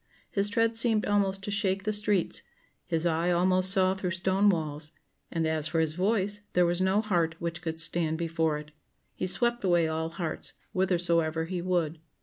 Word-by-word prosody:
His 200 0 +1
tread 230 +2 +1
seemed 225 -2 +3
almost 195 -1 0
to 205 - -4
shake 195 -2 -1
the 215 - -1
streets, 205 -3 0 0.5
his 165 +1 -1
eye 170 +1 +1
almost 185 +1 +4
saw 190 -1 +5
through 190 -1 -3
stone 190 +3 +2
walls, 155 -3 -2 0.4
and 165 -1 -1
as 160 -1 +1
for 165 +1 -1
his 160 -1 +1
voice, 200 +2 0
there 180 0 +4
was 175 +1 0
no 190 +3 +2
heart 170 -7 0
which 170 -1 -5
could 160 -1 -4
stand 165 -1 +1
before 165 -2 -1
it. 150 0 -10 0.4
He - - -3
swept 240 +4 0
away 175 -3 +3
all 160 0 -2
hearts, 165 -1 -4 0.2
whithersoever 170 -3 +1
he 180 +1 -4
would. 170 -3 -1
175 Hz, 180 wpm, -28 LUFS, 160-195 Hz, 0.5 s, saw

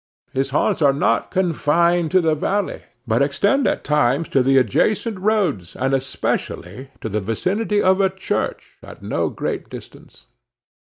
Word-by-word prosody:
His 135 +1 0
haunts 145 +3 0
are 140 -2 +5
not 115 -5 +1
confined 170 -1 +1
to 185 +2 +3
the 160 -2 +2
valley, 195 +6 -2 0.2
but 115 +1 +1
extend 200 - +2
at - - -1
times 150 +1 +1
to 135 - +3
the 135 +1 +3
adjacent 210 - +1
roads, 185 - 0
and 135 +1 -1
especially 130 -3 -3
to - - -4
the 105 0 -2
vicinity 200 - -1
of 190 +1 +3
a 190 - +3
church 190 0 -4
at - - -13
no - - -1
great - - -4
distance. - - -13
150 Hz, 155 wpm, -20 LUFS, 130-190 Hz, 0.2 s, are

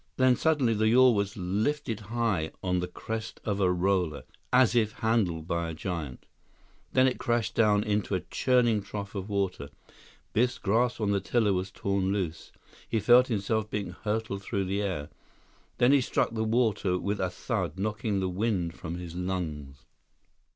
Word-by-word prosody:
Then, 130 -1 +5
suddenly, 140 -5 +2
the 110 0 +2
yawl 125 +2 +6
was 100 -1 -1
lifted 105 +6 -1
high 105 -6 -1
on 90 -1 +1
the 90 - -2
crest 110 +4 -6
of 105 -2 -1
a 95 -2 +3
roller, 90 -4 0 0.3
as 125 -2 +4
if 110 -3 +2
handled 95 -8 0
by 85 -1 -1
a 80 - -5
giant. 80 -7 -5 0.7
When 130 0 +4
it 130 - -1
crashed 120 -2 0
down 105 -2 +3
into 105 -1 0
a 90 - -1
churning 120 -4 +2
trough 100 0 -6
of 100 0 -5
water, 95 -8 -2 0.6
Biff's 125 +3 +2
grasp 115 +5 +1
on 105 -2 0
the 100 - +2
tiller 105 +2 +2
was 95 +1 -2
torn 100 0 -1
loose. 90 -5 -3 0.4
He 110 - +1
felt 120 +4 +6
himself 110 -1 -1
being 100 -4 -3
hurled 105 +1 -3
through 100 0 -2
the 100 +2 -1
air. 90 -8 -3 0.7
Then 120 +2 +4
he 140 -1 +5
struck 120 - 0
the 110 -1 -1
water 110 -5 +1
with 100 +3 -2
a 95 - 0
thud, 90 - -3
knocking 105 0 -1
the 95 - 0
wind 90 -3 -1
from 85 -1 -6
his 90 -2 -7
lungs. 80 -7 -4
100 Hz, 170 wpm, -28 LUFS, 90-115 Hz, 0.7 s, yawl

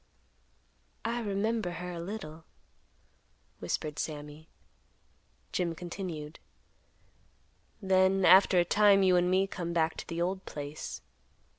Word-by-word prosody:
"I 235 +1 -1
remember 210 -2 -1
her 180 +1 -6
a 170 - -6
little," 170 -4 -7 1.2
whispered 150 -1 -3
Sammy. 150 0 -6 1.0
Jim 170 -2 -1
continued; 165 -3 -6 1.4
"Then 190 0 +3
after 185 +1 +7
a 175 - +4
time 200 +1 +5
you 185 -1 +4
and 180 0 +3
me 190 +1 +3
come 175 -3 -5
back 160 -1 +1
to - - -7
the 165 0 -4
old 185 +2 -1
place. 145 +1 -7
180 Hz, 115 wpm, -30 LUFS, 165-195 Hz, 1.4 s, after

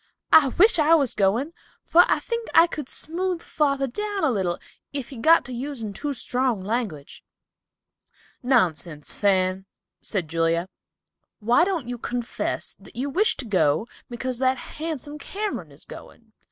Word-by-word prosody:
"I 300 -3 +8
wish 360 - +4
I 310 +2 +6
was 280 -6 +1
going, 220 +10 +1 0.3
for 350 +2 +6
I - - +3
think 465 -1 -4
I 330 - +9
could 300 -5 -6
smooth 355 +2 -2
father 275 -4 0
down 410 - -3
a 300 - +3
little 185 -5 -1 0.3
if 280 -4 -4
he 270 - -9
got 320 +5 +5
to 255 - -7
using 245 -4 -5
too 290 +8 -4
strong 250 -2 -1
language." 200 - -4 1.2
"Nonsense, 175 - 0
Fan," 190 -1 +1 0.3
said 185 -7 -2
Julia. 165 +2 0 0.7
"Why 235 +7 +3
don't 350 -9 -1
you 245 -1 -5
confess 240 0 -3
that - - -16
you 275 +3 -2
wish 410 +9 +2
to 265 - -5
go 185 -4 +2 0.2
because 245 0 -3
that 260 0 +2
handsome 300 0 -6
Cameron 385 - -4
is 140 - -15
going? 225 -2 -13
250 Hz, 155 wpm, -24 LUFS, 200-310 Hz, 1.2 s, I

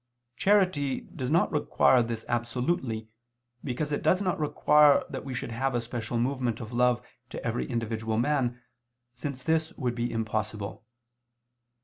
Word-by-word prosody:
Charity 180 - +2
does 130 -2 -6
not 165 +4 +3
require 130 -4 +4
this 115 -1 -3
absolutely, 120 0 -1 0.6
because 145 +3 -2
it 145 - -1
does 185 - +3
not 185 -4 -1
require 150 -1 +5
that - - -5
we 135 -2 -5
should 120 - -4
have 130 +2 -1
a - - +2
special 115 0 -4
movement 125 -2 0
of 115 0 -7
love 125 0 +2 0.2
to - - -7
every 60 - -1
individual 110 -1 -2
man, 125 -1 +1 0.5
since 130 0 -5
this 160 +1 +1
would 125 -2 -2
be 120 0 -2
impossible. 110 -1 -3
125 Hz, 145 wpm, -28 LUFS, 115-145 Hz, 0.6 s, require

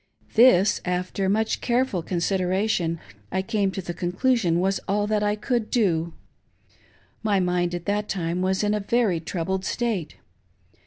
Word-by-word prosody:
This, 220 -5 +5
after 180 +2 -1
much 220 +2 0
careful 240 -6 +1
consideration, 180 0 0 0.3
I 190 - 0
came 205 -2 0
to 190 0 -5
the 175 - -4
conclu 185 +10 +1
sion 175 -7 +1
was 190 +2 +1
all 205 +1 +1
that 210 0 0
I 210 0 +1
could 220 +1 -1
do. 170 -8 +1 1.1
My 210 -3 +2
mind 180 -1 0
at 175 -1 -6
that 205 +1 -1
time 175 -1 -2
was 190 +2 +1
in 210 0 +1
a 210 - 0
very 210 -4 +1
troubled 185 +3 -3
state. 220 -8 -2
190 Hz, 155 wpm, -24 LUFS, 180-215 Hz, 1.1 s, This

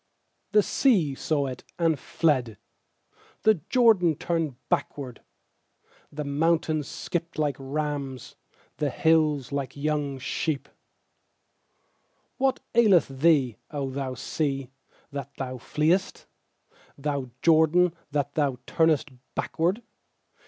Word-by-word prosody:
3The 210 -1 +5
sea 190 - +3
saw 145 +1 0
it, 130 -2 -6
and 165 -4 +2
fled; 130 -11 0 0.9
The 215 -7 +4
Jordan 220 - +4
turned 165 -4 -1
backward. 130 -5 -2 0.9
4The 150 0 -5
mountains 155 0 +1
skipped 170 -1 -4
like 150 -3 +1
rams, 140 -2 -4 0.4
The 150 - 0
hills 150 -2 +2
like 140 -1 -3
young 145 -1 -1
sheep* 135 +3 -2 1.7
8What 265 -1 +1
aileth 210 - +5
thee, 135 -4 +3
0 140 -3 -3
thou 130 -1 -3
sea, 135 0 -2 0.4
that 140 -1 -6
thou 130 -1 -4
fleest? 160 +9 0 0.7
Thou 140 -2 -2
Jordan, 165 +2 +5 0.2
that 145 -1 -1
thou 140 -4 +1
turnest 160 -3 +2 0.2
backward? 180 +8 0
150 Hz, 105 wpm, -26 LUFS, 135-165 Hz, 1.7 s, 3The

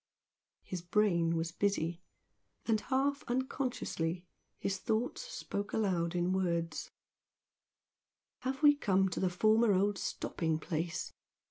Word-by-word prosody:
His 180 -2 -5
brain 175 -3 +2
was 165 0 -1
busy; 175 -3 0 0.6
and 220 -2 +2
half 280 +1 +1
unconsciously 240 - -2 0.3
his 195 -1 -2
thoughts 225 +3 -1
spoke 210 - -5
aloud 180 -5 +1
in 175 +1 +1
words 170 -3 -1 1.5
"Have 265 +3 -3
we 295 -1 +9
come 190 -8 +2
to 180 - -3
the 185 - +2
former 215 +4 +4
old 200 +1 +2
stopping 160 -2 -1
place?" 165 +1 -3
190 Hz, 115 wpm, -33 LUFS, 170-225 Hz, 1.5 s, we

